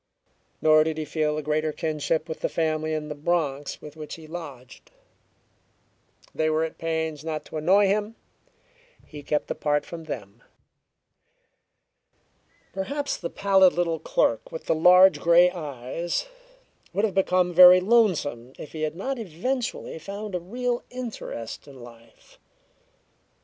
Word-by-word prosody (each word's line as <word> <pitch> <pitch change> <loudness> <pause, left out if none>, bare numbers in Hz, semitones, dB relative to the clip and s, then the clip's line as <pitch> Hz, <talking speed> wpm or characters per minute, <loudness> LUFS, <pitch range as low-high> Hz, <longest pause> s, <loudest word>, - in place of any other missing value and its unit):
Nor 155 0 +6
did 160 0 -3
he 155 - -3
feel 150 0 -1
a 155 - -3
greater 155 +1 0
kinship 155 +1 -2
with 160 - -6
the - - -1
family 155 -1 -1
in 150 -1 -4
the 150 - -4
Bronx 145 -2 -2
with 150 0 -10
which 155 -1 -7
he 160 - -12
lodged. 145 -7 -10 1.4
They 155 0 0
were 155 +1 +1
at 160 - -5
pains 160 -2 -2
not 155 -1 -4
to - - -7
annoy 190 +7 +4
him; 210 +3 0 0.9
he 150 -2 -10
kept 150 +1 -2
apart 150 0 0
from 165 -1 -9
them. 115 -6 -8 2.3
Perhaps 280 +10 -3
the 170 - -5
pallid 190 -2 +4
little 170 -2 -1
clerk 115 -7 0
with 160 - -7
the - - +2
large 180 +4 +6
grey 175 +1 +5
eyes 155 - -4 0.7
would 200 - +2
have 205 - -2
become 180 -2 +2
very 180 +1 +9
lonesome 180 - +1
if - - -9
he 155 - -7
had 155 0 -2
not 260 +8 -3
eventually 225 +1 -4
found 200 +3 -7
a 180 - -1
real 240 +7 -3
interest 230 - -7
in 135 -2 -13
life. 115 -1 -16
160 Hz, 145 wpm, -25 LUFS, 150-185 Hz, 2.3 s, very